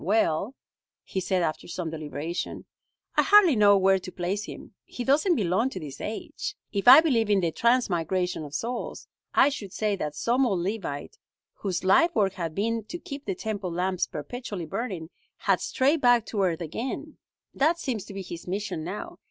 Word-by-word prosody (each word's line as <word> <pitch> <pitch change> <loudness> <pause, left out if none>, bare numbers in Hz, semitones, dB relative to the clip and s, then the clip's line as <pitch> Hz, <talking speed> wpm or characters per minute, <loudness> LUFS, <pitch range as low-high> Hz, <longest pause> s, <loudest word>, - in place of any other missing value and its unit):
"Well," 200 - +1 0.5
he 190 - -3
said 185 -1 0
after 155 -2 -2
some 175 -2 -4
deliberation, 155 +2 -5 0.5
"I - - +7
hardly 390 -7 +6
know 205 -2 +6
where 190 0 +4
to 185 - -8
place 190 +4 -2
him. - - -10
He 245 - -6
doesn't 305 +8 +3
belong 205 - +1
to 190 - -6
this 150 -5 -8
age. 225 - -5 0.2
If 200 +1 -2
I 265 +5 +11
believed 235 -9 +1
in 200 -2 +4
the 170 -2 0
transmigration 180 -6 +1
of 145 -1 -8
souls, 235 - -4 0.3
I - - +6
should 210 -9 -6
say 210 0 0
that 150 -4 -4
some 250 - +2
old 190 -6 0
Levite, 185 -7 -4 0.3
whose 190 -3 -3
life 330 - +4
work 195 -3 +2
had 165 -4 -4
been 225 +2 0
to 345 - -6
keep 285 -4 -8
the 195 - -2
Temple 205 -3 -4
lamps 180 +1 0
perpetually 200 - -6
burning, 190 -3 -4 0.3
had - - +1
strayed 280 +4 +1
back 245 -2 +5
to 205 - -2
earth 175 -3 +1
again. 260 - -5 0.3
"That 315 +5 +2
seems 245 - -3
to - - -10
be 195 - -4
his 170 -1 -8
mission 190 -4 -3
now. 210 - -6
200 Hz, 185 wpm, -27 LUFS, 175-245 Hz, 0.5 s, I